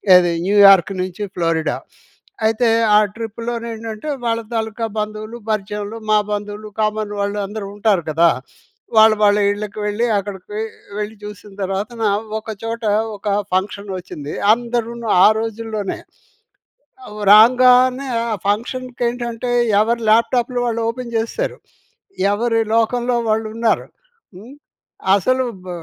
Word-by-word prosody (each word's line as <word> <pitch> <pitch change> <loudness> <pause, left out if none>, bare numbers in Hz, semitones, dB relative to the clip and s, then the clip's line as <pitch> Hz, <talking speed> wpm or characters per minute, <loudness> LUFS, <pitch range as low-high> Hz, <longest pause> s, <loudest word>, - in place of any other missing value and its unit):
ఏది 175 -1 +5
న్యూయార్క్ 195 -2 +6
నుంచి 185 +2 -4
ఫ్లోరిడా. 165 -2 0 0.7
అయితే 225 +2 +2 0.3
ఆ - - +7 0.2
ట్రిప్‌లోని 230 +1 -5
ఏంటంటే 225 +5 -6 0.2
వాళ్ళ 230 0 0
తాలూకా 225 0 -2
బంధువులు, 215 +2 -5
పరిచయంలు 210 +1 -3
మా 215 - +5
బంధువులు 210 +1 -4
కామన్ 215 -1 -1
వాళ్ళు 205 +1 -2
అందరూ 205 +1 -6
ఉంటారు 205 -4 +1
కదా! 165 +2 +4 0.7
వాళ్ళు, 220 0 +7
వాళ్ళ 205 0 +5 0.2
ఇళ్ళకి 210 0 -6
వెళ్ళి 210 +3 0
అక్కడికి 200 +1 -6 0.4
వెళ్ళి 210 +1 -4
చూసిన 210 0 -10
తర్వాతన 205 +5 -3 0.4
ఒక 220 0 -7
చోట 230 +1 -4 0.3
ఒక 200 - -21 0.3
ఫంక్షన్ 200 +2 -2
వచ్చింది. 150 -5 -7 0.2
అందరును 235 -1 -3
ఆ - - +9
రోజుల్లోనే, 220 -2 -4 1.3
రాంగానే, 255 +4 +6 0.3
ఆ - - 0
ఫంక్షన్‌కి 250 +4 -2
ఏంటంటే 240 0 -4 0.3
ఎవరు 235 +2 0
ల్యాప్టాప్‌లు 245 +2 +2
వాళ్ళు 230 -1 -1
ఓపెన్ 235 0 -6
చేసేసారు. 230 - -2 0.8
ఎవరి 225 +1 +1
లోకంలో 240 +2 +1
వాళ్ళు 220 0 +1
ఉన్నారు. 230 -1 +1 0.5
హ్మ్, 230 +9 -12 0.6
అసలు 255 +6 +1 0.2
బ్ - - -8
220 Hz, 120 wpm, -19 LUFS, 205-235 Hz, 1.3 s, ఆ